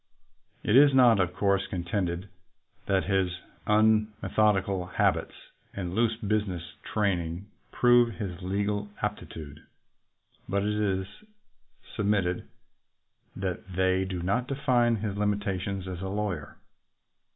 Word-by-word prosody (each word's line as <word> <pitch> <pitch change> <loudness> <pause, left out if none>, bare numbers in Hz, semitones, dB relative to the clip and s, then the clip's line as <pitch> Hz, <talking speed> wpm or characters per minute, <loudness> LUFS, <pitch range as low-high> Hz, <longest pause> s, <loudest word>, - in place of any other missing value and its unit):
It 105 - +2
is 140 0 +7
not, 120 -5 +6
of 90 -2 +2
course, 100 -1 +1
contended 90 +1 -2 0.6
that 95 -1 +2
his 95 -3 0 0.3
unmeth 110 0 +2
odical 95 -3 +2
habits - - +1 0.4
and 90 -3 -4
loose 115 +2 +2
business 105 -5 -1 0.2
training 90 -4 -1 0.3
prove 120 -2 +4
his 90 -2 -5
legal 100 +2 -1
aptitude, 80 -8 -5 0.9
but 100 +1 +1
it 105 +1 0
is 100 -3 0 0.9
submitted 100 -4 0 0.9
that 95 -2 -2 0.2
they 95 0 +2
do 95 -2 -4
not 120 +7 0
define 125 -4 +2
his 105 -2 -3
limitations 100 -2 -1
as 90 -1 -5
a 95 - -3
lawyer. 100 -7 -3
100 Hz, 115 wpm, -28 LUFS, 95-105 Hz, 0.9 s, is